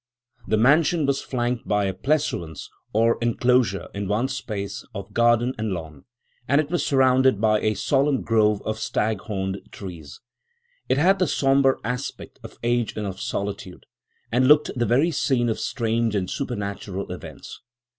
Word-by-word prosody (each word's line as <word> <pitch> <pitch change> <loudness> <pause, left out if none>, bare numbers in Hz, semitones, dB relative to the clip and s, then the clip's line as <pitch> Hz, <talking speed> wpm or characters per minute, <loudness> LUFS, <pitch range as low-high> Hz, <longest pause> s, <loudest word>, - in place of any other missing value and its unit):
The 110 +2 +2
mansion 150 +6 +4
was 140 0 0
flanked 120 -1 -2
by 105 -1 +1
a 95 - -1
pleasaunce 95 - -2 0.2
or 115 +2 +2
enclosure 120 -3 +1
in 100 0 -4
one 110 +6 0
space, 110 -7 -5
of 100 +1 -7
garden 120 +2 +3
and 110 0 -1
lawn, 80 -5 -8 0.4
and 140 +2 +3
it 155 0 -1
was 175 - 0
surrounded 130 -4 +3
by 110 0 +3
a 110 0 0
solemn 135 +5 +1
grove 105 -2 +2
of 110 0 -3
stag 110 -2 -1
horned 95 -2 -3
trees. 85 -8 -9 0.7
It - - +3
had 185 +6 +4
the 185 - +2
sombre 135 -1 +3
aspect 125 +4 -5
of - - -11
age 120 -1 0
and 105 - -2
of 95 -1 -5
solitude, 100 -2 -5 0.5
and 125 +2 +3
looked 150 +1 +5
the 120 -1 0
very 140 +8 +3
scene 130 -5 +1
of 110 - -2
strange 115 -2 -1
and 95 -2 0
supernatural 100 -6 -4
events. - - -9
115 Hz, 160 wpm, -24 LUFS, 100-135 Hz, 0.7 s, looked